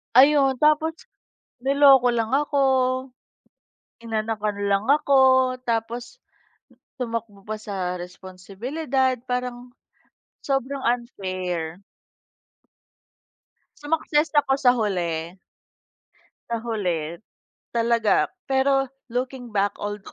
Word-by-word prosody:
Ayun, 270 Hz, -1 st, +5 dB
tapos 310 Hz, +2 st, +2 dB, 0.5 s
niloko 270 Hz, -1 st, +5 dB
lang 230 Hz, 0 st, 0 dB
ako, 285 Hz, +1 st, +1 dB, 1.5 s
inanakan 215 Hz, -2 st, -2 dB
lang 200 Hz, +1 st, +1 dB
ako 285 Hz, -2 st, +3 dB, 0.5 s
tapos 235 Hz, -, -3 dB, 0.8 s
tumakbo 230 Hz, -5 st, -5 dB
pa 215 Hz, 0 st, -5 dB
sa 185 Hz, -4 st, -4 dB
responsibilidad. 230 Hz, -, -3 dB
Parang 250 Hz, 0 st, -4 dB, 0.7 s
sobrang 275 Hz, 0 st, -2 dB
unfair. 185 Hz, -8 st, -3 dB, 2.0 s
Sumakses 305 Hz, 0 st, +1 dB
ako 280 Hz, -2 st, +3 dB
sa 250 Hz, -, +6 dB
huli. 175 Hz, -5 st, -2 dB, 1.2 s
Sa 235 Hz, -, -1 dB
huli, 180 Hz, -7 st, -3 dB, 0.5 s
talaga. 230 Hz, -2 st, +2 dB, 0.2 s
Pero 270 Hz, 0 st, +2 dB, 0.2 s
looking 245 Hz, -1 st, -4 dB
back, 200 Hz, 0 st, +1 dB
all 205 Hz, 0 st, -3 dB
tho -, -, -13 dB
235 Hz, 85 wpm, -24 LUFS, 200-270 Hz, 2.0 s, sa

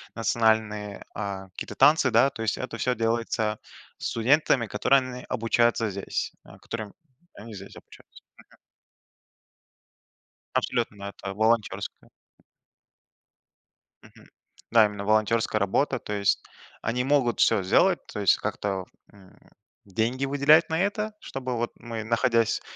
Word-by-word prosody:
национальные, 110 Hz, -2 st, 0 dB
а, 100 Hz, -2 st, -5 dB
какие-то 90 Hz, -, -8 dB
танцы, 150 Hz, -3 st, +5 dB
да. 120 Hz, +4 st, +4 dB
То 115 Hz, -, -8 dB
есть 110 Hz, -2 st, 0 dB
это 130 Hz, -2 st, -5 dB
всё 125 Hz, +2 st, 0 dB
делается 115 Hz, -1 st, -1 dB, 0.4 s
студентами, 130 Hz, +1 st, +2 dB
которые 125 Hz, +6 st, +3 dB
они 125 Hz, -1 st, -7 dB
обучаются 115 Hz, -2 st, +1 dB
здесь. 100 Hz, 0 st, -3 dB
А, -, -, -15 dB
которыми 110 Hz, -3 st, -7 dB, 0.4 s
они 110 Hz, +1 st, -10 dB
здесь 100 Hz, 0 st, -10 dB
обучаются. -, -, -16 dB, 0.3 s
Мгм. -, -, -20 dB, 2.0 s
Абсолютно, 115 Hz, -4 st, -1 dB
да. 100 Hz, 0 st, -6 dB
Это 95 Hz, -1 st, -7 dB
волонтерская. 110 Hz, +1 st, -1 dB, 1.9 s
Мгм. -, -, -18 dB, 0.5 s
Да, 115 Hz, -1 st, +7 dB
именно 105 Hz, -1 st, -5 dB
волонтерская 110 Hz, +1 st, +2 dB
работа. 100 Hz, +9 st, +1 dB
То 105 Hz, -, -6 dB
есть 100 Hz, -1 st, +1 dB, 0.4 s
они 125 Hz, +3 st, -1 dB
могут 130 Hz, -3 st, +1 dB
всё -, -, +4 dB
сделать, 175 Hz, -, +3 dB
то -, -, -6 dB
есть 100 Hz, -3 st, +4 dB
как-то, 95 Hz, -2 st, -3 dB, 0.3 s
м, 95 Hz, -2 st, -19 dB, 0.5 s
деньги 115 Hz, +7 st, -1 dB
выделять 145 Hz, +4 st, +4 dB
на 160 Hz, +1 st, 0 dB
это, 210 Hz, +3 st, -1 dB
чтобы 130 Hz, -, -5 dB
вот 120 Hz, +1 st, -2 dB
мы, 115 Hz, -2 st, -6 dB
находясь, 115 Hz, 0 st, +1 dB
115 Hz, 125 wpm, -26 LUFS, 105-125 Hz, 2.0 s, Да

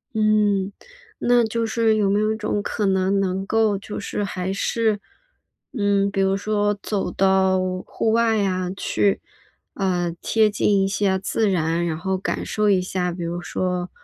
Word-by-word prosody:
嗯， 210 Hz, -2 st, +2 dB, 0.5 s
那 245 Hz, 0 st, +3 dB
就 230 Hz, +1 st, -1 dB
是 225 Hz, 0 st, +2 dB
有 205 Hz, -2 st, +2 dB
没 200 Hz, +1 st, +2 dB
有 215 Hz, +1 st, +1 dB
一 -, -, -3 dB
种 210 Hz, -1 st, -2 dB
可 210 Hz, +1 st, -2 dB
能 190 Hz, 0 st, +2 dB
能 190 Hz, 0 st, -1 dB
够 220 Hz, -1 st, +2 dB
就 205 Hz, +2 st, -7 dB
是 205 Hz, -, -3 dB
还 185 Hz, -1 st, -3 dB
是 215 Hz, +2 st, 0 dB, 0.8 s
嗯， 200 Hz, -1 st, +2 dB
比 195 Hz, -, -2 dB
如 195 Hz, 0 st, +2 dB
说 205 Hz, 0 st, 0 dB
走 200 Hz, -4 st, -1 dB
到 190 Hz, 0 st, +3 dB, 0.3 s
户 225 Hz, -, -1 dB
外 230 Hz, -1 st, +3 dB
呀， 185 Hz, -3 st, 0 dB
去， 200 Hz, 0 st, 0 dB, 0.5 s
呃， 180 Hz, -3 st, 0 dB
贴 220 Hz, -1 st, +3 dB
近 205 Hz, -1 st, +2 dB
一 -, -, +2 dB
下 195 Hz, 0 st, +1 dB
自 210 Hz, +3 st, 0 dB
然。 170 Hz, -2 st, 0 dB
然 160 Hz, -2 st, -2 dB
后 190 Hz, +3 st, -1 dB
感 185 Hz, -, -3 dB
受 210 Hz, -1 st, +1 dB
一 190 Hz, -2 st, +3 dB
下， 180 Hz, -1 st, -2 dB
比 175 Hz, 0 st, -6 dB
如 170 Hz, +1 st, -3 dB
说 180 Hz, 0 st, -2 dB
200 Hz, 185 characters per minute, -22 LUFS, 185-215 Hz, 0.8 s, 那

